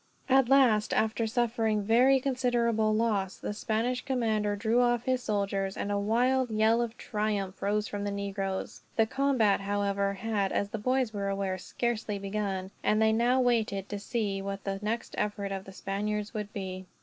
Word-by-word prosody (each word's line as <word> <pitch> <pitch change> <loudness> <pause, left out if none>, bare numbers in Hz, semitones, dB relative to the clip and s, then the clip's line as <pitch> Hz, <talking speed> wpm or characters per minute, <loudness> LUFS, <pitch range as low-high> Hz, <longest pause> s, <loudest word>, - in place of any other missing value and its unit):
At 265 -2 +4
last, 245 -6 +4
after 220 +1 +1
suffering 225 -2 0
very 250 +6 +5
considerable 240 -4 +1
loss, 215 -4 0
the - - -4
Spanish 230 +4 -1
commander 220 -6 0
drew 225 +4 +2
off 240 -1 +2
his 255 0 0
soldiers; 200 -3 -1
and 205 - -2
a 200 - +1
wild 245 +5 +2
yell 220 +2 +3
of 235 0 -3
triumph 210 -3 -2
rose 210 +1 0
from 205 0 -4
the 205 - -1
negroes. 195 -1 -4
The 225 - +4
combat 255 -5 +2
however 200 0 0
had, 205 -2 -1
as 200 - 0
the 220 - -4
boys 255 0 0
were 200 -1 -2
aware, 195 -1 -2
scarcely 225 0 -2
begun; 195 -1 -3
and 215 - +2
they 220 0 +4
now 240 +3 +3
waited, 220 -5 +1
to 205 - -4
see 205 -2 -2
what 195 0 -5
the 195 0 -3
next 225 +3 -3
effort 205 -1 -2
of 195 0 -4
the 195 - -10
Spaniards 205 +3 -3
would 210 -2 -4
be. 185 -2 -6
215 Hz, 175 wpm, -29 LUFS, 200-235 Hz, -, very